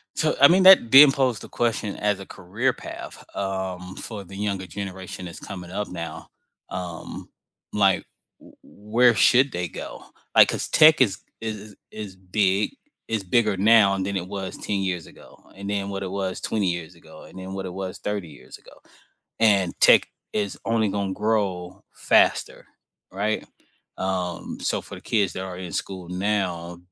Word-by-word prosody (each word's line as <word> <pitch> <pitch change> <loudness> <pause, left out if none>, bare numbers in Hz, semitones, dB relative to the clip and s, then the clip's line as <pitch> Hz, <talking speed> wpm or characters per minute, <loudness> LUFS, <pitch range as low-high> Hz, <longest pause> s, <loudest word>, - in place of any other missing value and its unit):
So, 155 - +1
I 140 - +11
mean 185 +4 +4
that 185 -11 +8
then 135 +1 +10
pose 130 -4 0
the - - -11
question 110 -3 -1
as 105 -1 0
a 95 - -8
career 105 +11 -2
path, - - -9
um, 95 -1 -4
for 105 -3 -7
the 95 +1 -12
younger 100 -2 -3
generation 95 -2 -7
that's 85 +1 -9
coming 90 -3 -8
up 105 +2 -3
now, 85 -2 -7 0.4
um, 90 -2 -7 0.4
like, 100 -3 +2 0.3
w - - -18
where 115 +3 +2
should 130 +5 +5
they 90 -3 -3
go? 75 - -8 0.3
Like, - - +8
cause - - -2
tech 155 -2 +6
is 110 -7 +2 0.2
is 110 -1 -3
is 105 0 -13 0.2
is 105 -3 -8
big, 95 +1 0 0.4
is 110 -3 -2
bigger 110 +2 +2
now 100 -1 +5
than 95 +1 -2
it 90 -1 -5
was 95 -1 -6
10 105 - -2
years 95 -4 -3
ago, - - -17
and 100 +1 -7
then 100 -1 -2
what 100 0 -4
it 95 - -5
was 95 -1 -3
20 105 -4 0
years 85 0 -6
ago, 80 -2 -15
and 80 - -14
then 95 +1 -7
what 95 0 -5
it 90 - -6
was 95 0 -5
30 105 -4 -3
years 70 - -13
ago - - -18 0.7
and 100 -5 +4
tech - - +7 0.3
is 100 -2 -2
only 115 -2 +1
gonna 100 -1 -2
grow 95 -4 -2
faster, - - +2 0.5
right? 105 +3 -1 0.5
Um, 90 -2 -3
so - - -1
for - - -11
the - - -11
kids 105 -4 0
that 95 - -4
are 95 -1 -6
in 90 -2 -7
school 95 -3 -5
now, 90 -3 -2
100 Hz, 175 wpm, -24 LUFS, 95-105 Hz, 0.7 s, I